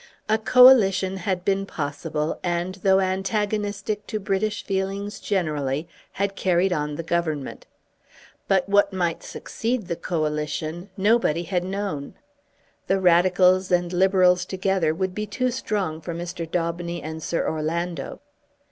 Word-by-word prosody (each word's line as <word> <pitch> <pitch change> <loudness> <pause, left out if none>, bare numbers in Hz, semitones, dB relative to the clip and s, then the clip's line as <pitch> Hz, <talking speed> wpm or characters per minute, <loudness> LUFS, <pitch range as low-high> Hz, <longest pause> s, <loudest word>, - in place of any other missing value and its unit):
A 220 +1 +2
Coalition 210 -6 +6
had 185 0 -2
been 195 0 +1
possible 150 0 -3
and, 175 +1 -1
though 190 0 +4
antagonistic 205 +2 -1
to 215 - -3
British 205 +1 -1
feelings 195 +1 -3
generally, 155 -6 -1 0.3
had 200 0 -2
carried 185 0 +2
on 150 -2 -2
the 165 - -5
Government. 160 -4 -2 0.8
But 190 -1 +2
what 200 0 +3
might 175 -3 -1
succeed 230 -2 -3
the 170 - -3
Coalition, 155 +2 -3
nobody 200 -5 +2
had 180 +1 -1
known. 190 -7 -4 0.7
The 195 - +2
Radicals 185 +1 +4
and 175 0 +1
Liberals 180 -1 +4
together 185 -3 0
would 185 +1 -2
be 210 +2 -4
too 255 +5 -1
strong 200 -10 -2
for 165 +1 -5
Mr. 170 -1 -5
Daubeny 170 0 -2
and 160 +1 -6
Sir 165 - -1
Orlando. 160 0 -3
185 Hz, 130 wpm, -24 LUFS, 165-195 Hz, 0.8 s, Coalition